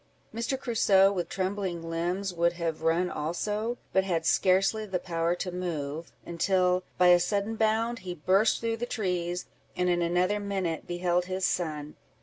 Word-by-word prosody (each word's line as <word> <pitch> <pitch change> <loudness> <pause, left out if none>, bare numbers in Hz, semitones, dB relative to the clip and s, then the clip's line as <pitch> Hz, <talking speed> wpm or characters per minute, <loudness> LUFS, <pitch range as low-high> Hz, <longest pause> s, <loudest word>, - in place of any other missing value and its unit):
Mr. 235 +4 -2
Crusoe, 200 -6 +4
with 175 -4 -3
trembling 185 -3 -3
limbs, 175 +4 -2
would 170 0 +2
have 165 -2 -3
run 165 +3 +2
also, 210 +10 -2 0.2
but 190 - +4
had 170 -4 -1
scarcely 195 +5 +2
power 175 -2 -1
to 180 +1 -4
move, 165 -3 -4
until, 180 +1 +1 0.2
by 180 0 +5
a 175 0 +7
sudden 200 +4 -1
bound, 225 +2 +1
he 180 -1 -6
burst 190 +7 +2
through 230 0 -1
the 240 +1 -3
trees, 180 -5 -2 0.3
and 180 0 +1
in 175 0 +2
another 180 +4 +1
minute 190 -5 -3
beheld 175 0 0
his 185 0 -1
son. 150 -5 -2
180 Hz, 155 wpm, -28 LUFS, 170-200 Hz, 0.3 s, a